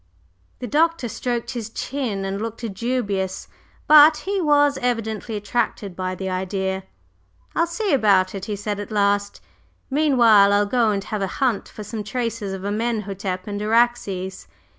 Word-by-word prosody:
The - - -6
Doctor 325 0 +1
stroked 240 +1 -3
his 230 -3 -5
chin 225 -5 -3
and 195 +1 -3
looked 230 +1 -5
dubious, 200 -4 -2 0.4
but 305 +1 +8
he 395 0 0
was 290 -2 +3
evidently 225 -2 -2
attracted 205 -2 -2
by 185 0 -3
the 190 +1 -5
idea. 190 +1 -2 0.7
"I'll 335 - +2
see 375 +3 -1
about 200 -7 +3
it," 195 -1 -5
he 210 - -3
said 205 0 -4
at 205 - -6
last. 205 -1 0 0.5
"Meanwhile 235 -9 +5
I'll 205 0 +3
go 230 +1 +2
and 200 -2 -1
have 215 0 -4
a 195 - 0
hunt 250 -6 0
for 215 - -9
some 210 +1 -5
traces 230 -2 -3
of 190 -1 -6
Amenhotep 200 -3 -2
and 205 -1 -4
Araxes." 210 -4 0
215 Hz, 155 wpm, -22 LUFS, 195-245 Hz, 0.7 s, but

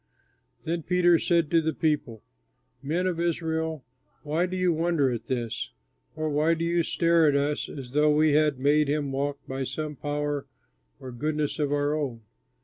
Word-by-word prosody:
Then 165 +1 -2
Peter 175 0 +3
said 170 -4 +1
to 165 -1 +4
the 160 0 -2
people: 145 -8 -1 0.6
"Men 165 +6 -1
of 180 -3 -1
Israel, 160 -3 -1 0.4
why 155 +4 0
do 185 +1 -4
you 180 -2 +2
wonder 160 -4 +1
at 120 - -5
this? 120 -3 -3 0.4
Or 155 0 -2
why 155 +2 +2
do 165 +1 -2
you 170 0 +2
stare 165 -1 +3
at 145 - +3
us 145 +1 0
as 130 -4 -8
though 150 +2 +3
we 155 +1 +4
had 150 -1 +3
made 145 +3 +3
him 145 -1 -1
walk 140 +1 -1
by 135 0 -3
some 150 +3 -4
power 145 0 -3 0.5
or 130 - -8
goodness 150 +4 -2
of 145 -2 0
our 145 0 +1
own? 135 -7 -3
150 Hz, 175 wpm, -26 LUFS, 140-165 Hz, 0.6 s, to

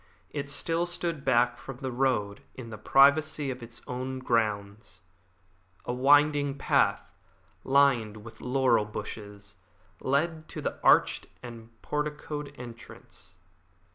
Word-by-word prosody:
It 140 -1 -4
still 165 +4 -1
stood 170 -4 -3
back 120 -2 +3
from 135 0 -9
the 130 -1 -4
road 120 -6 0
in 115 -3 -9
the 110 - -7
privacy 140 +2 +4
of 125 0 -7
its 115 0 -8
own 130 +1 -4
grounds. 105 -6 -2 0.8
A 120 - -2
winding 145 +2 +4
path, - - +1 0.5
lined 125 -6 +2
with 115 -1 -12
laurel 125 -4 +2
bushes, 105 -2 -8 0.4
led 155 +4 -1
to - - -7
the - - -4
arched - - +4 0.2
and 115 -2 -10
porticoed 150 -1 -4
entrance. 115 -7 -12
130 Hz, 120 wpm, -28 LUFS, 115-145 Hz, 0.8 s, privacy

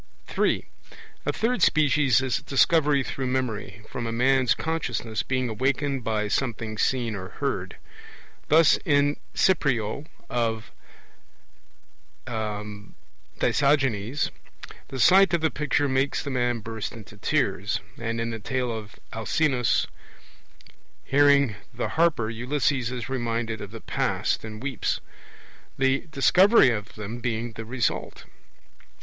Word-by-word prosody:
(3) - - 0 0.6
A - - +3
third 240 +3 0
species 145 -4 +4
is 130 -3 0
Discovery 145 0 +3
through 130 0 -4
memory, 120 -5 -3
from 120 -2 -4
a - - -2
man's 130 +1 +3
consciousness 125 -9 -2
being 130 -1 -1
awakened 135 +3 -1
by 110 -2 0
something 110 -1 -2
seen 120 -4 0
or 95 -2 -6
heard. - - -3 0.7
Thus 160 0 +5
in 145 -3 +3
The - - -16 0.2
Cyprioe 140 - +1 0.2
of 115 -2 -2 1.5
Dicaeogenes, 110 +4 -1 0.6
the 135 - -6
sight 190 +7 +6
of 170 - -1
the 160 - +2
picture 145 -1 0
makes 135 +1 0
the 140 - -4
man 120 -2 0
burst 110 0 -5
into 110 -2 -11
tears; - - 0 0.2
and 115 0 -2
in 115 0 -2
the 115 - -5
Tale 125 +3 -2
of 110 -2 -7 0.2
Alcinous, 125 +3 +1 1.2
hearing 140 -5 +4
the 120 -1 -3
harper 160 -9 +2
Ulysses 125 +2 0
is 125 -2 -5
reminded 115 -4 -2
of 100 - -7
the 115 +1 -9
past - - -1
and 110 +1 -8
weeps; 135 -5 -1 0.8
the 135 +3 +1
Discovery 180 - +5
of 105 -2 -5
them 110 +3 -6
being 120 -1 -2
the 115 0 -8
result. 120 0 -2
125 Hz, 125 wpm, -25 LUFS, 110-140 Hz, 1.5 s, sight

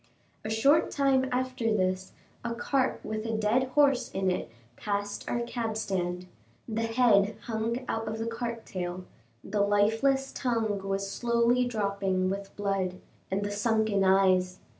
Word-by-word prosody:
A 215 - -4
short 275 +9 +4
time 270 -2 +2
after 255 -1 -2
this, 185 -2 0 0.3
a 235 -1 -2
cart 260 +2 0
with 215 0 -3
a 225 -1 -2
dead 220 +4 +2
horse 280 -3 +4
in 190 -1 0
it 180 - -3 0.3
passed 205 - -3
our 240 - 0
cab 235 -2 -3
stand. 180 -4 -2 0.4
The 225 -1 -2
head 220 -3 +4
hung 230 +2 -2
out 225 0 -2
of 220 +1 -3
the 225 - -3
cart 230 0 -4
tail, 180 0 -5 0.4
the 205 +1 -1
lifeless 225 +7 +2
tongue 225 -5 -1
was 195 0 -1
slowly 235 +2 +2
dropping 200 -5 0
with 200 0 -6
blood; 195 -3 -1 0.3
and 195 +2 -1
the 205 - -2
sunken 215 -1 +1
eyes! 185 -1 +3
220 Hz, 150 wpm, -29 LUFS, 195-240 Hz, 0.4 s, short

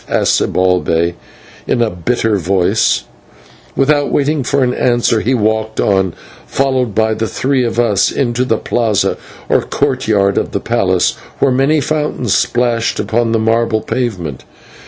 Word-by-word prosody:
asked - - +2
Zibalbay 90 -2 +1 0.5
in - - 0
a 115 -2 +1
bitter 110 +5 -1
voice, 95 0 +1
and, - - -25 0.7
without 145 +1 +2
waiting 145 +1 +1
for 140 +2 +1
an 125 -1 +1
answer, 120 -2 +1
he 130 +2 +1
walked 110 -1 -1
on, 95 -3 +1 0.3
followed 130 -5 0
by 110 0 +2
the 110 +1 -2
three 130 +3 0
of 115 -1 -2
us, 105 -5 +2
into 125 -2 0
the 115 -3 0
/plaza/ 110 -4 0 0.3
or - - +2
courtyard 110 -8 0
of - - -4
the - - 0
palace, - - +1 0.3
where 135 - +2
many 135 +4 +2
fountains 150 -7 -1
splashed 120 -2 0
upon 115 0 0
the 115 - +2
marble 115 0 +1
pavement. 95 - -3
115 Hz, 150 wpm, -15 LUFS, 105-130 Hz, 0.7 s, asked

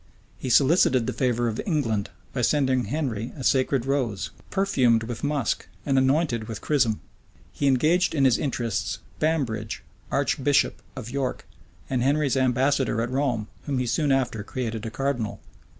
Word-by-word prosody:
He 130 - -4
solicited 130 -1 +4
the - - -2
favor 120 -2 +1
of 110 -1 -2
England, 115 - 0 0.2
by 125 - -1
sending 130 -1 +2
Henry 125 -7 -3
a 135 - -6
sacred 130 -1 +2
rose, 130 -8 -1 0.2
perfumed 130 - +2
with 115 0 -6
musk 145 -5 -1 0.2
and 135 - +1
anointed 130 -4 +2
with 110 -2 -5
chrism.[] 130 -8 +1 0.5
He 140 - 0
engaged 155 +8 +3
in 140 -2 +3
his 125 -3 +4
interests 120 -7 -2 0.2
Bambridge, 125 -9 -1 0.3
archbishop 140 0 +1
of 120 - -7
York, 135 -1 -2 0.4
and 130 -2 0
Henry's 140 +1 +2
ambassador 130 -1 +2
at 115 +2 -1
Rome, 130 -6 0 0.2
whom 140 -2 0
he 125 - 0
soon 145 +4 +1
after 130 -5 +1
created 115 -1 -4
a - - -2
cardinal. 130 -4 -2
130 Hz, 150 wpm, -25 LUFS, 115-140 Hz, 0.5 s, solicited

